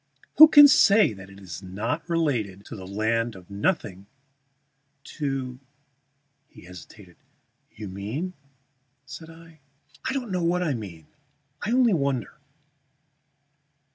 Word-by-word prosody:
Who 310 - +11
can 290 -2 +9
say 210 - +4
that 95 -1 -12
it 100 0 -15
is 90 -2 -9
not 110 - -5
related 120 - -2
to - - -9
the 95 -3 -10
land 110 +3 -1
of 95 +1 -15
nothing, 100 - -2 1.0
to 135 -4 -5 0.4
" 140 0 -48
He - - -14
hesitated. 90 +1 -14 0.5
"You 105 -1 -10
mean?" 110 - -5 0.7
said 145 +3 -11
I. 165 -1 -16 0.5
"I - - -2
don't 250 -6 -4
know 180 -2 -1
what 180 +2 0
I 155 -5 -1
mean. 95 - -8 0.6
I 205 - -4
only 245 -3 +3
wonder. 140 -6 -2
130 Hz, 130 wpm, -25 LUFS, 100-165 Hz, 1.0 s, Who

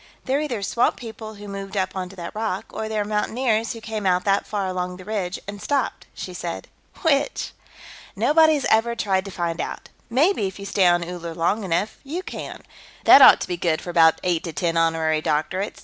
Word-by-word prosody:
"They're 275 +2 +1
either 245 -9 -3
swamp 235 +5 +1
people 220 -2 -9
who 205 0 -10
moved 195 0 -6
up 190 0 -1
onto 185 0 -5
that 170 -2 -7
rock, 215 -3 -2
or 220 0 -4
they're 215 -1 -1
mountaineers 220 +2 0
who 230 - -10
came 215 -3 -3
out 180 0 +2
that 200 0 +1
far 205 -2 -2
along 180 -1 -3
the 185 - -12
ridge 195 -4 -2
and 200 0 -7
stopped," 285 -1 -1
she - - -6
said. - - -5 0.4
"Which?" 290 -3 +1 0.6
"Nobody's 310 -2 +4
ever 230 +2 +3
tried 195 -4 0
to 195 - -7
find 170 -2 -2
out. - - -6 0.2
Maybe 265 - +2
if 190 - -8
you 200 - -8
stay 195 -2 +3
on 175 0 +3
Uller 170 -2 -6
long 195 +6 0
enough, 185 +3 -1
you 325 +7 -5
can. - - -7 0.4
That 280 - +9
ought - - +9
to - - -3
be 180 -1 -3
good 165 -2 0
for 175 - -6
about 165 -2 +5
eight 175 -3 0
to 165 - -5
ten 165 +3 -1
honorary 165 -1 +1
doctorates. 160 +6 -1
200 Hz, 205 wpm, -23 LUFS, 180-225 Hz, 0.6 s, That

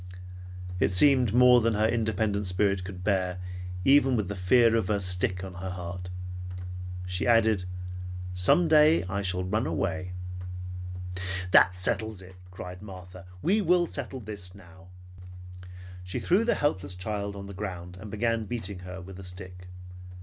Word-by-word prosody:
It - - +3
seemed 125 +3 +5
more 125 +1 +7
than 115 -1 +1
her 105 +1 +3
independent 110 -3 0
spirit 95 +1 +1
could 90 -1 -8
bear 95 -3 0 0.5
even 135 -2 +5
with 105 -5 -1
the 100 - -3
fear 115 +5 +4
of 110 -5 +1
the 105 0 +1
stick 90 0 +1
on 95 -1 -7
her 90 +1 -6
heart. 90 0 -6 1.0
She 90 +4 -2
added, 110 -5 +4 0.7
"Some 90 - +5
day 155 -2 +5
I 95 +2 -3
shall 90 -1 -1
ran 105 +6 0
away." 90 -2 -2 1.4
"That 90 -1 +6
settles 105 +3 -1
it!" 95 +1 -13 0.2
cried 90 0 -8
Martha. 90 -2 -11 0.2
"We 205 +5 +3
will 180 -1 +3
settle 135 -4 -5
this 100 -4 -7
now!" 90 -1 -16 1.2
She 90 - -4
threw 195 +6 +2
the 235 - +2
helpless 95 -10 -1
child 100 +1 -4
on 100 0 -7
the 100 - -8
ground 90 -3 -6
and 105 - -8
began 115 +1 0
beating 100 -4 -3
her 90 +1 -8
with 95 +1 -10
the 95 - -9
stick. 90 0 -9
100 Hz, 155 wpm, -28 LUFS, 90-115 Hz, 1.4 s, more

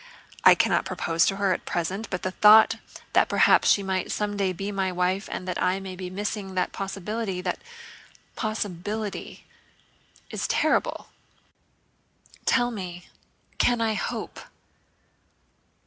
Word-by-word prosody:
I - - +9
cannot - - +2
propose 165 0 +1
to 195 - +1
her 195 -1 +1
at - - -5
present, 185 +6 -2
but 185 - -4
the 185 - -1
thought 215 +3 +7 0.4
that - - +4
perhaps - - +4
she 200 - +4
might 190 -1 -2
someday 205 -2 -1
be 195 +3 -4
my 190 -2 -1
wife 180 +2 -1
and 185 - -5
that 180 - -3
I 185 +1 +1
may 190 -1 -7
be 180 0 -6
missing 195 0 -4
that 185 - 0
possibility... 195 +1 -4
that 180 -1 -3 0.8
possibility... 210 -1 -4 0.9
is - - -2
terrible. - - 0 1.4
Tell 245 0 +3
me, 180 -5 -7 0.5
can 245 -1 +3
I 225 -1 +1
hope? - - -4
195 Hz, 130 wpm, -25 LUFS, 185-210 Hz, 1.4 s, I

